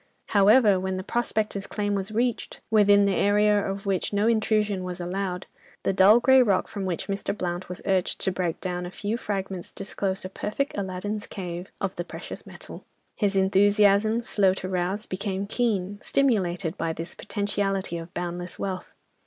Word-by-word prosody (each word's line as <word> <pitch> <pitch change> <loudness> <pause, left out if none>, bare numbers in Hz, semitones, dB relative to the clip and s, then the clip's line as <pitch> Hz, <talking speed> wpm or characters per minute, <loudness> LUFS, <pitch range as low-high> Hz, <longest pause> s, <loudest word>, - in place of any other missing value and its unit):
However, 205 0 +5
when 190 0 -2
the 185 - -4
prospectors' 215 -3 -1
claim 205 -1 -1
was 195 +1 -2
reached, 235 +1 -1
within 205 -2 +6
the 200 - +2
area 210 +1 +4
of 195 +1 -4
which 195 -2 0
no 205 +1 +2
intrusion 215 -3 +1
was 180 0 -5
allowed, 180 +1 -3 0.4
the - - +1
dull 200 +4 +7
grey 265 +1 +6
rock 200 -6 +2
from 200 -2 -5
which 180 -3 -2
Mr. 200 +1 -3
Blount 175 -1 -3
was 180 - -7
urged 190 -2 +1
to 190 - +1
break 180 -3 -2
down 180 -1 -3
a - - -6
few 205 +4 -3
fragments 195 -5 -4
disclosed 195 -1 -3
a - - -4
perfect 210 +8 -3
Aladdin's 205 +2 -3
cave 180 -1 -6
of 195 -1 -3
the 175 - -2
precious - - -8
metal. - - -8 0.3
His 205 -2 0
enthusiasm, 205 +3 +4
slow 195 -5 +2
to 185 - -5
arouse, 185 +3 -1
became 195 +1 -3
keen, 205 -3 -1
stimulated 190 -9 +1
by 165 -1 -1
this 165 +2 -6
"potentiality 200 -4 -2
of 165 +1 -9
boundless 175 0 -4
wealth." 190 -1 -5
195 Hz, 170 wpm, -26 LUFS, 185-210 Hz, 0.4 s, dull